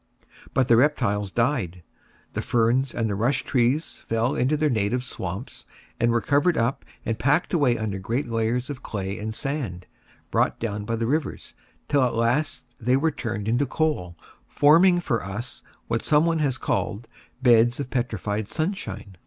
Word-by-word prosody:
But 130 -2 +3
the 115 - +6
reptiles 115 -8 +2
died; 115 - 0 0.5
the - - -2
ferns 120 +3 +2
and 115 -2 0
the 105 - -1
rush 120 +7 +1
trees 130 +5 +1
fell 115 +3 +1
into 140 +5 +1
their 155 +1 +2
native 115 +3 0
swamps, 125 +2 -6 0.3
and 120 0 +3
were 115 0 +2
covered 145 - +2
up 115 +4 0 0.2
and 115 - -2
packed 145 +8 +2
away 140 -8 +3
under 105 -3 -3
great 115 +8 -2
layers 115 +3 -1
of 135 -2 -7
clay 100 -3 -4
and 110 +1 -4
sand 125 - -3 0.5
brought - - +1
down 105 -2 -3
by 115 - -1
the 115 0 -1
rivers, 145 +5 -2 0.3
till 145 -2 +3
at 125 -2 +1
last 120 +2 0
they 125 +3 +2
were 160 +3 +1
turned 110 -6 -4
into 120 +5 +1
coal, 125 - -1 0.3
forming 175 +5 +5
for 115 -10 -1
us, 100 +6 -6 0.3
what 115 - 0
someone 160 +2 +3
has 135 -4 0
called, 110 -2 -2 0.4
beds 120 0 +5
of 140 -3 -4
petrified 110 -4 -2
sunshine. 155 - -4
120 Hz, 165 wpm, -25 LUFS, 110-140 Hz, 0.5 s, the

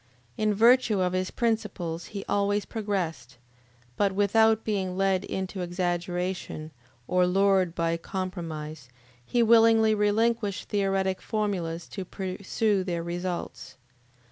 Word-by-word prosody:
In 215 0 +1
virtue 235 -1 +5
of 180 -1 +1
his 185 0 -1
principles 205 -8 -2
he 200 -2 -7
always 205 0 +1
progressed, 165 - -3 0.6
but 200 -1 +2
without 220 +3 +3
being 190 -4 -2
led 195 -1 +2
into 190 0 -4
exaggeration 175 -2 -3 0.4
or 180 0 +3
lured 190 -2 +2
by 165 0 0
compromise; 165 -7 -5 0.3
he 235 - +1
willingly 225 -1 +5
relinquished 215 0 0
theoretic 195 -2 0
formulas 180 -6 -2
to 195 - -5
pursue 190 +2 -1
their 170 -2 -3
results. 175 -5 -5
190 Hz, 115 wpm, -27 LUFS, 175-210 Hz, 0.6 s, virtue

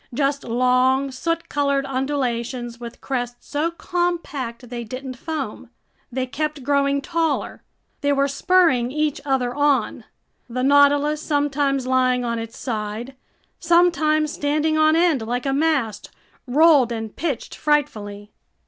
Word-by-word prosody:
Just 280 0 0
long, 255 +3 +2
soot 330 +6 -2
colored 280 -1 0
undulations 255 -3 -2
with 235 -1 -9
crests 245 -2 -4
so 305 +3 0
compact 335 -9 -3
they 240 -1 -4
didn't 255 +3 -6
foam. 270 -4 -5 0.4
They 255 +1 -1
kept 300 +2 -3
growing 280 0 +1
taller. 330 -2 -1 0.4
They 285 - +1
were 280 0 +2
spurring 280 -4 +2
each 300 0 -1
other 260 -3 0
on. 275 -6 +1 0.4
The 255 +2 -2
Nautilus, 285 +2 +4
sometimes 285 -3 0
lying 255 -1 +2
on 235 -1 -2
its 225 0 -7
side, 225 +2 -4 0.4
sometimes 325 -3 +3
standing 300 +2 0
on 310 0 +4
end 330 -6 +3
like 245 +3 -3
a 270 - 0
mast, 275 -8 0 0.4
rolled 285 -2 +5
and 225 -2 -5
pitched 300 -8 -3
frightfully. 215 -9 -1
275 Hz, 130 wpm, -22 LUFS, 245-300 Hz, 0.4 s, rolled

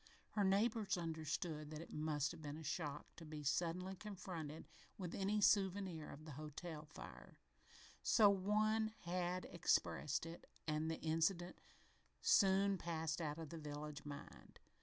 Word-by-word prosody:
Her 210 - +2
neighbors 205 +1 +3
understood 160 -1 -2
that 155 0 -5
it 165 - -9
must 150 -1 +1
have 170 -2 -9
been 145 0 -4
a 160 - -7
shock 155 -1 -2
"to 170 - -8
be 155 -1 -6
suddenly 175 +5 0
confronted 175 -6 -6 0.3
with 180 -3 -4
any 205 +2 +1
souvenir 190 -5 +3
of 155 +2 -9
the 155 - -7
hotel 155 +2 -6
fire" 150 - -10 0.6
so 215 -3 +7
one 215 +3 +3
had 180 +1 -1
expressed 155 -3 +1
it 165 +1 -8 0.2
and 155 +1 +1
the 160 - -2
incident 165 +3 +1 0.6
soon 195 -1 +5
passed 165 0 -1
out 150 -1 -1
of 160 -2 -5
the 165 - -6
village 150 -1 -5
mind. 145 -1 -9
165 Hz, 145 wpm, -41 LUFS, 155-190 Hz, 0.6 s, so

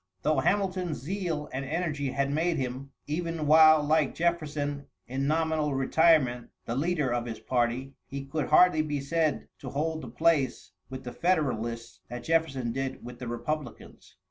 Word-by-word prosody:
Though 155 -2 +2
Hamilton's 185 -1 0
zeal 160 +1 -3
and 130 +1 -2
energy 150 -1 -2
had 140 +1 -1
made 165 +3 +1
him, 130 +1 -4 0.2
even 165 +1 -2
while 155 0 +7
like 150 -1 +2
Jefferson 150 -4 -1 0.2
in 135 +2 -2
nominal 155 -2 +1
retirement, 135 -3 +3 0.2
the 115 - -3
leader 150 -3 0
of 120 0 -2
his 115 -2 -5
party, 120 +3 -1
he 140 0 -6
could 150 +2 -2
hardly 155 +1 +5
be 150 -2 -2
said 155 +2 0
to 130 - -7
hold 160 +4 -2
the - - -8
place 155 -6 +1 0.2
with 130 0 -7
the 125 -1 -7
Federalists 120 -10 -1
that 120 0 -6
Jefferson 135 -6 0
did 135 0 -4
with 120 0 -9
the 125 - -6
Republicans. 135 +3 -5
145 Hz, 160 wpm, -28 LUFS, 130-160 Hz, 0.2 s, while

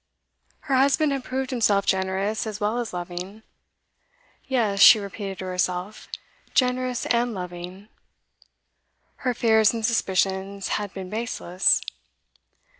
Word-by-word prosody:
Her 270 -3 0
husband 280 +3 +3
had 275 -2 -2
proved 260 +1 -3
himself 210 -5 +2
generous 190 +3 -1
as 210 -1 -5
well 215 +3 0
as 240 - -4
loving; 180 +4 -7 1.0
yes, 220 -7 0
she 220 +2 +10
repeated 200 -1 -6
to 190 - -6
herself, 180 +2 -3 0.5
generous 250 -1 +1
and 240 -1 0
loving; 180 +2 -8 1.3
her 250 -2 -2
fears 220 -2 +4
and 225 -1 -2
suspicions 195 -3 0
had 205 -2 -2
been 190 -1 -8
baseless. 210 -5 +1
210 Hz, 115 wpm, -24 LUFS, 190-240 Hz, 1.3 s, she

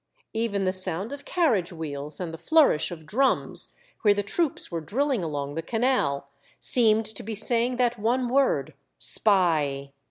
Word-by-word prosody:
Even 220 -3 -1
the 185 - +1
sound 185 +5 +1
of 285 0 -9
carriage 235 - +1
wheels 150 -3 -6
and 175 -3 -5
the - - -6
flourish 295 - +3
of 165 -3 -9
drums, 265 - 0 0.3
where 205 -2 +4
the 205 - -1
troops 295 - -2
were 165 -1 -3
drilling 250 - -1
along 145 -3 -4
the 165 - -3
canal, 220 - 0 0.3
seemed 220 -3 +4
to 215 0 -4
be 220 +1 -5
saying 235 +3 +2
that 245 -2 0
one 245 +4 0
word 270 +2 +1 0.2
*' - - -52
Spy 155 -9 +2
205 Hz, 165 wpm, -25 LUFS, 165-245 Hz, 0.3 s, where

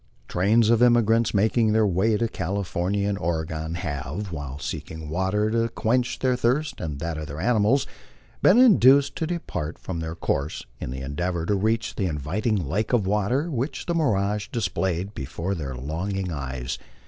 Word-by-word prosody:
Trains 110 +5 +3
of 115 0 +3
emigrants 115 -2 +4
making 110 +2 +2
their 110 0 +4
way 100 +3 +2
to 115 - +1
California 100 0 -2
and 100 -1 -1
Oregon 80 -1 -2
have, 80 +3 -4
while 70 -4 -5
seeking 80 +1 -6
water 95 +6 0
to 115 0 +1
quench 120 +2 0
their 130 -1 +1
thirst 125 +4 0
and 75 -5 -4
that 80 +1 -3
of 75 - -5
their 75 +2 -7
animals, 115 - +3 0.6
been 195 - +6
induced 140 - +6
to 160 - -1
depart 155 - -4
from 85 -3 -5
their 80 0 -4
course 70 -4 -2
in - - -5
the 65 +1 -5
endeavor 85 +5 -2
to 105 - +1
reach 110 +3 0
the 95 - -1
inviting 85 - -1
lake 105 - -1
of 115 -5 +3
water 105 - 0
which 130 +2 -3
the 170 - -1
mirage 105 -10 +1
displayed 95 -5 -1
before 80 +6 -4
their 70 -7 -4
longing 90 +8 -3
eyes. 65 -4 -4
100 Hz, 170 wpm, -25 LUFS, 80-115 Hz, 0.6 s, been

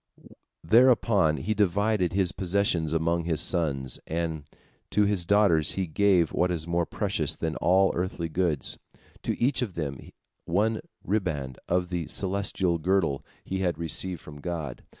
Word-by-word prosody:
Thereupon 110 -6 +4
he 110 +6 -1
divided 100 -1 +1
his 95 -2 +1
possessions 90 -4 0
among 85 +1 0
his 80 -3 0
sons, 70 -7 0
and 80 -2 -3 0.4
to 105 - +3
his 100 -4 +1
daughters 100 -6 +3
he 95 - -1
gave 90 0 +2
what 90 - +2
is 85 -3 -1
more 85 0 0
precious 95 -8 -1
than 80 -1 -3
all 95 +2 +4
earthly 90 -1 -2
goods, 80 -5 -1 0.4
to - - -3
each 130 +2 +2
of 105 -7 -3
them 70 -5 -3 0.5
one 105 +6 +1 0.2
riband 80 - -2
of 90 0 +1
the 85 -3 -3
celestial 95 -3 -1
girdle 85 -5 +1 0.2
he 95 - -3
had 90 -4 0
received 85 +2 -3
from 75 -1 -11
God. 80 -7 -4
90 Hz, 150 wpm, -27 LUFS, 80-100 Hz, 0.5 s, Thereupon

